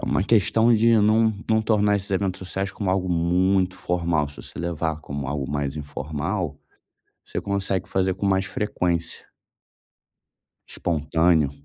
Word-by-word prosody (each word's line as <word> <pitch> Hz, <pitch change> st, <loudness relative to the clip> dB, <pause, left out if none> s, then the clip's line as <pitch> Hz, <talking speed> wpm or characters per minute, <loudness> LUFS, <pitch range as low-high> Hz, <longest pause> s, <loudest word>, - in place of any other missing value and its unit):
uma -, -, +2 dB
questão 110 Hz, +2 st, +3 dB
de 115 Hz, +1 st, +5 dB
não 110 Hz, +1 st, +3 dB, 0.2 s
não 110 Hz, 0 st, +4 dB
tornar 105 Hz, -2 st, +2 dB
esses 100 Hz, 0 st, -4 dB
eventos 95 Hz, 0 st, 0 dB
sociais 95 Hz, +1 st, -3 dB
como 100 Hz, -3 st, -4 dB
algo 95 Hz, 0 st, +1 dB
muito 90 Hz, +2 st, +2 dB
formal. 85 Hz, -5 st, 0 dB
Se 75 Hz, -, -11 dB
você -, -, -10 dB
levar 80 Hz, -2 st, -2 dB
como 70 Hz, -2 st, -5 dB
algo 70 Hz, -1 st, -3 dB
mais 70 Hz, 0 st, -2 dB
informal, 75 Hz, +3 st, -3 dB, 0.7 s
você -, -, -4 dB
consegue 95 Hz, -2 st, -1 dB
fazer 95 Hz, -1 st, 0 dB
com 100 Hz, -, -3 dB
mais 95 Hz, 0 st, +2 dB
frequência. 90 Hz, -5 st, -2 dB, 1.4 s
Espontâneo. 80 Hz, -1 st, +1 dB
90 Hz, 140 wpm, -24 LUFS, 80-100 Hz, 1.4 s, de